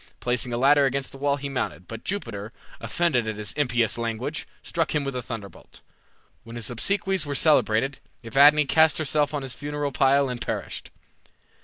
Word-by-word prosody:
Placing 125 Hz, 0 st, -1 dB
a 120 Hz, -, -1 dB
ladder 140 Hz, +2 st, +5 dB
against 135 Hz, 0 st, -3 dB
the 135 Hz, -, -12 dB
wall 140 Hz, 0 st, +2 dB
he 140 Hz, 0 st, -5 dB
mounted, 90 Hz, -, -4 dB
but 115 Hz, 0 st, -8 dB
Jupiter, 115 Hz, -, -4 dB, 0.3 s
offended 125 Hz, 0 st, 0 dB
at 110 Hz, -, -2 dB
his 105 Hz, 0 st, -5 dB
impious 120 Hz, -5 st, +1 dB
language, 115 Hz, +6 st, -3 dB, 0.2 s
struck 165 Hz, -2 st, -1 dB
him 150 Hz, -, +1 dB
with 140 Hz, -1 st, -4 dB
a 125 Hz, -, -2 dB
thunderbolt. 110 Hz, -6 st, -9 dB, 0.6 s
When 115 Hz, 0 st, -10 dB
his 120 Hz, -1 st, -5 dB
obsequies 190 Hz, -, 0 dB
were 145 Hz, -2 st, -4 dB
celebrated, 135 Hz, -3 st, +2 dB, 0.2 s
Evadne 145 Hz, +5 st, +6 dB
cast 160 Hz, +2 st, +4 dB
herself 150 Hz, -1 st, +1 dB
on 145 Hz, -2 st, -3 dB
his 130 Hz, -2 st, -5 dB
funeral 145 Hz, 0 st, -3 dB
pile 140 Hz, +1 st, +3 dB
and 125 Hz, -2 st, -5 dB
perished. -, -, -4 dB
135 Hz, 175 wpm, -25 LUFS, 115-145 Hz, 0.6 s, Evadne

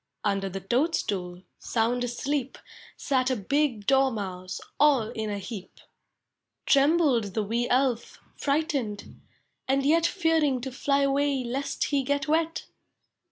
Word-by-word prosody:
Under 195 Hz, -2 st, 0 dB
the 195 Hz, +1 st, -6 dB
toadstool, 195 Hz, -, -1 dB, 0.2 s
Sound 240 Hz, +2 st, 0 dB
asleep. 265 Hz, +2 st, -2 dB, 0.4 s
Sat 260 Hz, -2 st, +1 dB
a 260 Hz, -, +1 dB
big 245 Hz, 0 st, 0 dB
Dormouse 200 Hz, -9 st, 0 dB, 0.2 s
All 275 Hz, -7 st, +4 dB
in 220 Hz, -1 st, -4 dB
a 205 Hz, -, -2 dB
heap. 200 Hz, -1 st, -8 dB, 0.9 s
Trembled 275 Hz, -, +3 dB
the 215 Hz, -, +1 dB
wee 235 Hz, +4 st, -1 dB
Elf, 250 Hz, -2 st, 0 dB, 0.2 s
Frightened, 280 Hz, -8 st, -2 dB, 0.5 s
and 270 Hz, +1 st, +1 dB
yet 330 Hz, +3 st, +4 dB
Fearing 325 Hz, -7 st, +1 dB
to 265 Hz, +1 st, -5 dB
fly 280 Hz, +2 st, +1 dB
away 275 Hz, -1 st, +1 dB
Lest 265 Hz, +4 st, -2 dB
he 285 Hz, -2 st, +1 dB
get 285 Hz, +3 st, -1 dB
wet. 320 Hz, +1 st, 0 dB
260 Hz, 125 wpm, -27 LUFS, 220-285 Hz, 0.9 s, All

